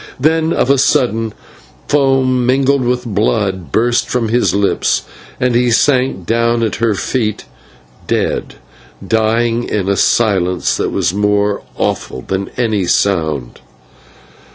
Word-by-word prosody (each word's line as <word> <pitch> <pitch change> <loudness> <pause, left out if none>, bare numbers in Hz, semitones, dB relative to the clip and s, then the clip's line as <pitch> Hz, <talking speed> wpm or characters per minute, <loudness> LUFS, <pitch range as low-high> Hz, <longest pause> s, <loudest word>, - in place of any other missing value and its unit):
Then, 160 +3 +2
of 135 - +2
a 140 - +3
sudden, 115 -4 +1 0.6
foam 135 -3 +2
mingled 135 +2 +2
with 125 0 -1
blood 100 - -1
burst 120 +2 +1
from 120 -3 -1
his 120 +2 +2
lips, 100 0 +1 0.4
and 125 -1 +1
he 120 +1 +2
sank 125 -5 +1
down 115 +2 +1
at 110 - -1
her 115 -2 +1
feet 105 +2 -2 0.6
dead, - - -1 0.5
dying 115 +1 +1
in 100 -3 -1
a 100 - +2
silence 95 -5 +1
that - - -1
was - - -1
more 105 0 +1 0.2
awful - - -2
than 95 0 -3
any 110 -6 0
sound. 80 -10 0
115 Hz, 130 wpm, -15 LUFS, 100-125 Hz, 0.6 s, a